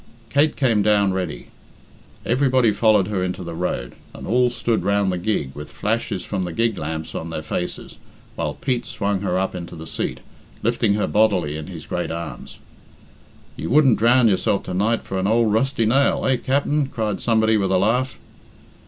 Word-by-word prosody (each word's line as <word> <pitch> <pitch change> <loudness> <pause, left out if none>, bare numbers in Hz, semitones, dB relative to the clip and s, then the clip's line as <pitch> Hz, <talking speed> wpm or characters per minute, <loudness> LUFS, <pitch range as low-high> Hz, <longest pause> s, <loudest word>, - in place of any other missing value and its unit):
Kate 145 +2 +3
came 120 -6 +2
down 100 -2 +3
ready. 90 -5 -4 0.8
Everybody 130 -2 +3
followed 105 -3 +3
her 95 -3 -1
into 90 0 -3
the 85 -1 -6
road, 80 -8 -3 0.2
and - - -8
all 125 0 +3
stood 120 -2 -1
round 100 -1 +2
the 90 - -2
gig 85 -9 -1
with 75 0 -9
flashes - - -2
from 95 - -3
the 90 - -4
gig 115 +3 +1
lamps 80 +1 -4
on 80 - -5
their 80 -1 -5
faces, 90 +3 -5 0.4
while - - -3
Pete 125 -3 -2
swung 100 -2 -2
her 95 -2 0
up 95 +1 -1
into 85 -1 -7
the 80 0 -8
seat, - - -4 0.4
lifting 115 -2 +2
her 105 - +1
bodily 95 -8 +2
in 75 -1 -6
his - - -8
great - - -3
arms. 85 0 -7 1.0
"You - - -5
wouldn't 135 -1 +5
drown 120 +2 +5
yourself 100 0 +1
to 90 - -5
night 110 +5 +1
for 95 - -3
an 95 - 0
ould 115 0 +3
rusty 115 +1 +1
nail, 135 +6 +2
eh, 130 -1 +3
Capt'n?" 140 +3 0
cried 110 -6 -3
somebody 110 -1 +3
with 100 -3 +1
a 95 - +4
laugh. 115 +6 +1
105 Hz, 185 wpm, -22 LUFS, 90-120 Hz, 1.0 s, wouldn't